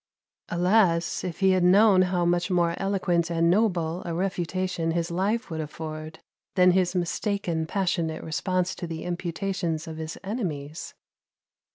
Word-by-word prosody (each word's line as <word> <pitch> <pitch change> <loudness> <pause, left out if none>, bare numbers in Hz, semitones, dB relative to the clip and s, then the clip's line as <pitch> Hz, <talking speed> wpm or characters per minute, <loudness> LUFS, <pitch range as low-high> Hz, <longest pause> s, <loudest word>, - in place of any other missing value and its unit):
Alas! 175 -1 +2
if 180 +1 -5
he 190 0 +5
had 185 -1 +2
known 195 +1 +6
how 180 -1 +1
much 175 +1 +1
more 175 -2 +2
eloquent 180 -4 0
and 170 0 +2
noble 180 -4 +1
a 170 - -4
refutation 185 -1 -1
his 170 0 -1
life 195 +4 -1
would 160 -1 -2
afford 155 +1 -7 0.4
than 180 -1 +6
his 185 0 +1
mistaken 175 -2 -1
passionate 170 -4 -1
response 180 +3 -1
to 175 - -6
the 160 -1 -5
imputations 175 -1 -3
of 160 -1 -6
his 160 0 -5
enemies! 165 - -4
175 Hz, 145 wpm, -26 LUFS, 165-190 Hz, 0.4 s, known